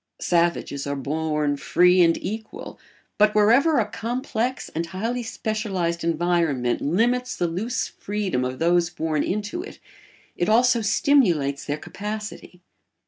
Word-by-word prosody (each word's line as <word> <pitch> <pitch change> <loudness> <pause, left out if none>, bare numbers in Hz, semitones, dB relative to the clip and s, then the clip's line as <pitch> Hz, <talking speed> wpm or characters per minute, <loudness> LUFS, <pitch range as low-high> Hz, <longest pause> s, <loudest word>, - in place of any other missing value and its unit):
Savages 170 -5 0
are 140 - -2
born 150 +1 -1
free 180 +5 +4
and 165 -1 +4
equal, 220 +2 -7 0.4
but 210 0 +4
wherever 240 +9 +4
a 225 - +3
complex 245 +2 -3
and 165 +1 -2
highly 225 +8 -3
specialised 210 -7 -2
environment 165 -7 0
limits 245 - +1
the 175 - -1
loose 195 +9 -2
freedom 200 -10 -3
of 130 0 -3
those 170 +1 +2
born 160 -3 -1
into 210 - -2
it, 400 - -10 0.6
it 175 - -1
also 240 +1 +4
stimulates 180 - +2
their 145 0 -2
capacity. 210 0 -7
180 Hz, 130 wpm, -23 LUFS, 160-220 Hz, 0.6 s, free